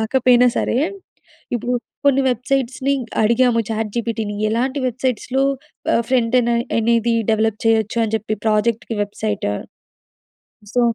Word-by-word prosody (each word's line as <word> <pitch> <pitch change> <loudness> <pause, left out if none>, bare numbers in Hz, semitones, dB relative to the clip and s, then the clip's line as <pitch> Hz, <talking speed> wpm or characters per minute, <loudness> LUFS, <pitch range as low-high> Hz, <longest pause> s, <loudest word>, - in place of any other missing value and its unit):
రాకపోయినా 250 +2 +4
సరే! 245 - 0 0.8
ఇప్పుడు 240 +1 -2 0.3
కొన్ని 275 -1 +4
వెబ్‌సైట్స్‌‌ని 260 +2 0 0.3
అడిగాము. 235 +1 +3
చాట్‌జీపీటీని 220 -1 -2 0.2
ఎలాంటి 260 +5 0
వెబ్‌సైట్స్‌లో 255 +2 -1 0.5
ఆహ్, 230 - +2
ఫ్రంటేన్ 245 -1 +2
అని 235 - -1 0.2
అనేది 230 0 +2 0.2
డెవలప్ 220 0 0
చేయొచ్చు, 220 0 +2
అని 220 0 -2
చెప్పి 215 0 -3
ప్రాజెక్ట్‌కి 220 +1 0
వెబ్సైట్. 205 - -3 1.3
సో, 245 - +3
235 Hz, 110 wpm, -20 LUFS, 220-250 Hz, 1.3 s, రాకపోయినా